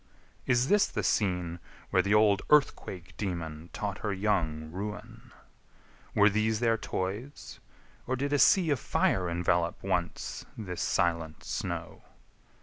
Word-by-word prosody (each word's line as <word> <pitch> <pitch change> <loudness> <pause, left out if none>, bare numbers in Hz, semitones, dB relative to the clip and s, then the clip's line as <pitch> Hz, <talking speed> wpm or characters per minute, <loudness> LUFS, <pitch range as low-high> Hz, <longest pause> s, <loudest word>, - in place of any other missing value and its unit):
Is 125 0 +3
this 205 +2 +4
the - - -3
scene 90 -4 0 0.3
Where - - +4
the 100 +1 +2
old 105 -2 +4
Earthquake 95 - +1
daemon 85 -4 -4
taught 100 -1 -4
her 105 - -2
young 85 -6 -1
Ruin? 105 +4 -7 0.8
Were 105 0 +6
these 110 +1 +1
their 115 -1 +3
toys? 110 +6 -5 0.5
or 130 - 0
did 140 +2 -2
a 145 - +3
sea 175 -1 +5
Of 140 - +1
fire 90 -4 +1
envelop 85 0 0
once - - -2
this 90 -5 -5
silent 85 -3 0
snow? - - -4
100 Hz, 135 wpm, -29 LUFS, 85-115 Hz, 0.8 s, Were